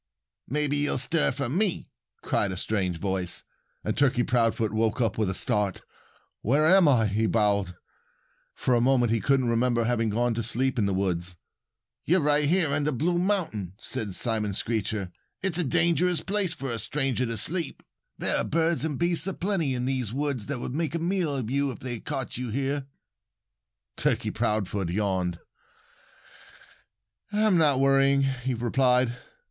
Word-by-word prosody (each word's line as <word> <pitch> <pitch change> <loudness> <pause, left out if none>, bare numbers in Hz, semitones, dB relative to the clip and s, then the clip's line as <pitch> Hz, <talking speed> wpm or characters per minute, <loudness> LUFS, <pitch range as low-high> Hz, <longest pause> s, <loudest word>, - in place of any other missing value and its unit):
"Maybe 145 +1 0
you'll 145 -1 +1
stir 150 +5 +2
for 140 0 -3
me," 180 - -1 0.3
cried 100 - 0
a 90 - -5
strange 95 -4 -1
voice. 95 -1 -3 0.4
And - - -2
Turkey 130 -4 +2
Proudfoot 115 -3 +1
woke 110 +2 0
up 115 -3 +1
with 110 -3 0
a 95 - -2
start. 100 -2 0 0.6
"Where 140 +8 +2
am 185 +1 +6
I?" 125 -6 +4
he 110 +2 +1
bawled. 100 -5 +1 0.8
For 130 - 0
a 120 - +3
moment 125 -2 +3
he 115 - +2
couldn't 135 -3 +2
remember 120 0 +2
having 115 -1 +1
gone 120 +3 +1
to 115 - -2
sleep 130 +3 -1
in 100 - +2
the 100 - 0
woods. 90 -2 -1 0.7
"You're 180 +4 +3
right 150 -1 +2 0.2
up 145 - -2
under 145 +1 0
Blue 170 +6 0
Mountain," 170 - -1
said 105 -5 -3
Simon 110 -4 -1
Screecher. 105 -4 -2 0.3
"It's 185 -3 0
a - - +2
dangerous 170 +4 +2
place 195 -3 -1
for 135 -2 -5
a 115 - -3
stranger 135 0 -1
to 115 0 -3
sleep. 170 - -2 0.3
There - - +1
are - - 0
birds 165 0 +1
and 155 -4 -1
beasts 170 +1 +2
a 195 - -2
plenty 170 -8 0
in 125 0 -2
these 130 -5 -1
woods 140 -4 -2
that 140 -1 -2
would 120 - -5
make 160 0 -1
a - - 0
meal 170 -3 0
of 125 -4 -3
you 140 +1 +1
if 130 - -6
they 120 -2 -5
caught 130 +3 -5
you 125 -1 -4
here." 135 +3 -2 1.1
Turkey - - 0
Proudfoot 100 -3 -1
yawned. 90 -2 -1 1.9
"I'm 210 -4 +3
not 145 -4 +4
worrying," 135 0 +4
he 130 -1 -1
replied. 125 +1 +2
125 Hz, 170 wpm, -26 LUFS, 110-150 Hz, 1.9 s, am